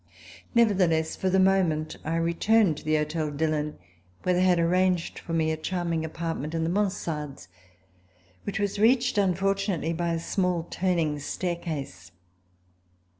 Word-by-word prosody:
Nevertheless, 185 -8 +3
for 190 - -1
the 190 +1 +3
moment 180 -5 +2
I 160 +2 -2
returned 170 +2 +2
to - - -9
the 155 0 +1
Hotel 155 0 -1
Dillon, 150 0 -1 0.5
where 180 - +2
they 180 - +2
had 185 -1 +4
arranged 180 +1 +1
for - - -9
me 160 -1 +2
a 160 - -2
charming 170 0 -2
appartevient 160 -1 -4
in 165 - 0
the 165 - 0
mansardeSy 160 - -2 1.0
which 200 +1 -3
was 200 -1 -1
reached 245 +1 +3
unfortunately 195 -2 0
by 170 0 -1
a - - -2
small 180 0 0
turning 170 -5 0
staircase. 150 - -4
170 Hz, 140 wpm, -27 LUFS, 155-190 Hz, 1.0 s, had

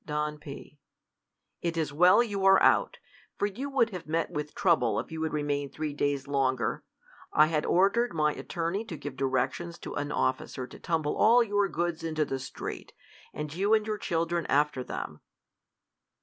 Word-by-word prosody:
Don 150 0 -3
P, 145 0 -10 0.8
It 170 -1 -2
is 155 -3 -1
well 180 +9 +6
you 200 -4 -3
are 195 0 +7
out; 485 - +4 0.4
for - - +1
you 235 +8 -4
would 245 -5 +2
have 180 -4 -7
met 165 +1 -1
with 150 0 -5
trouble, 160 - +2
if - - -6
you 160 0 -5
had 160 -1 -1
remained 145 -2 -2
three 155 -1 -3
days 145 -2 -1
longer. 130 -3 0 0.5
I 150 - +6
had 155 -1 -1
ordered 200 +7 +3
my 150 -2 +1
attorney 175 +4 -3
to 170 -7 -7
give 145 -2 -7
directions 135 +6 -1
to - - -6
an 145 0 -3
officer 130 -1 -1
to - - -13
tumble 160 -3 -1
all 235 +3 +6
your 205 -2 +1
goods 170 0 -2
into 155 -2 0
the 135 -1 -3
street, 130 - -7 0.4
and 150 -1 -5
you 200 +5 +3
and 215 -1 0
your 215 -1 -3
children 170 -1 -1
after 145 -3 +1
them. 75 -10 -6
160 Hz, 180 wpm, -29 LUFS, 145-190 Hz, 0.8 s, are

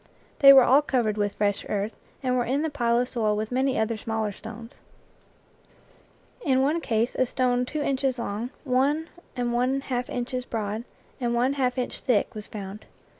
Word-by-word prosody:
They 275 -1 +10
were 270 -2 +9
all 270 +4 +5
covered 240 -7 0
with 205 -1 -1
fresh 205 -1 0
earth, 205 +1 -2 0.3
and 255 -1 +1
were 245 - +2
in 270 +5 0
the 320 - -1
pile 235 -4 +1
of 245 +1 +1
soil 215 -4 0
with 215 +2 -3
many 260 +1 +1
other 220 0 0
smaller 220 -1 -2
stones. 225 +3 -10 1.7
In 265 -3 +3
one 310 +5 +1
case 230 -3 0
a 255 - +1
stone 250 0 +1
two 305 +2 -3
inches 270 -2 0
long, 230 +1 -3
one 285 +5 +1 0.3
and 245 -1 -1
one 255 +3 +1
half 250 -2 -3
inches 250 +1 -3
broad, 220 -1 -4 0.3
and 240 -2 0
one 250 +3 +2
half 255 -2 0
inch 250 - -3
thick 240 -6 +1
was 215 -1 -6
found. 200 0 -8
245 Hz, 180 wpm, -26 LUFS, 220-265 Hz, 1.7 s, They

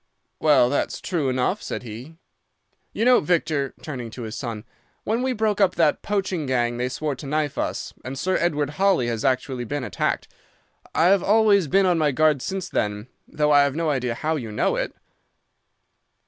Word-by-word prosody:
"'Well, 150 -5 +5
that's 145 - -1
true 160 -7 -1
enough,' 130 +11 0
said - - -5
he. 120 +8 -9 0.8
'You 225 - -1
know, 250 0 +6
Victor,' 155 -4 0
turning 125 -6 -5
to 120 +2 -8
his 110 0 -6
son, 115 -3 -5 0.4
'when 225 +3 0
we 260 0 0
broke 215 -3 0
up 185 -2 +3
that 160 -3 +2
poaching 190 -7 -2
gang, 120 -2 0
they 125 +1 -1
swore 150 +3 -2
to 135 +2 -9
knife 150 0 -1
us, - - -3
and 130 +1 -6
Sir 185 +5 0
Edward 150 -4 0
Holly 195 -10 +3
has 115 -2 -3
actually 130 -1 0
been 145 +3 -3
attacked. - - -2 0.7
I've 185 +4 +4
always 205 -4 +4
been 195 +6 +3
on 175 -2 +2
my 150 -2 +2
guard 150 0 +2
since 190 +3 -3
then, 105 +3 -2 0.2
though 150 0 0
I 145 -1 +7
have 140 -1 +1
no 165 -1 0
idea 125 -4 -1
how 155 +5 -1
you 115 -6 -6
know 105 - +1
it. - - -3
150 Hz, 185 wpm, -23 LUFS, 125-180 Hz, 0.8 s, I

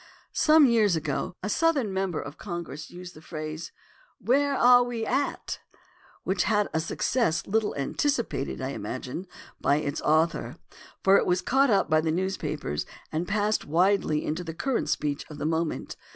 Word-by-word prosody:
Some 310 -1 +6
years 220 -7 +4
ago 155 +2 -2
a - - -1
Southern 275 -4 +1
member 190 -3 -1
of 140 +2 -8
Congress 170 -6 -6
used 180 0 -10
the 155 - -14
phrase, 155 0 -6 0.5
"Where 280 +3 +2
are 245 0 +7
we 240 -2 -2
at?" 280 +4 -1 0.6
which 185 -1 0
had 210 0 +2
a 160 - +1
suc 160 - -4
cess 195 -10 +1
little 220 +1 0
anticipated, 180 - -1
I 130 - -2
imagine, 130 - -5 0.3
by 140 - +3
its 145 0 -2
author, 160 +2 +1 0.5
for 195 +1 +6
it - - +1
was 180 0 +1
caught 270 +2 +3
up 200 - +3
by 155 0 +3
the 160 0 0
newspapers 155 - -2 0.2
and 165 +3 -2
passed 210 +1 +1
widely 170 -1 +2
into 160 +4 -2
the 165 -2 -6
current 265 +7 -1
speech 145 -1 -1
of 150 - -9
the - - -4
moment. 160 0 -1
180 Hz, 165 wpm, -27 LUFS, 155-220 Hz, 0.6 s, are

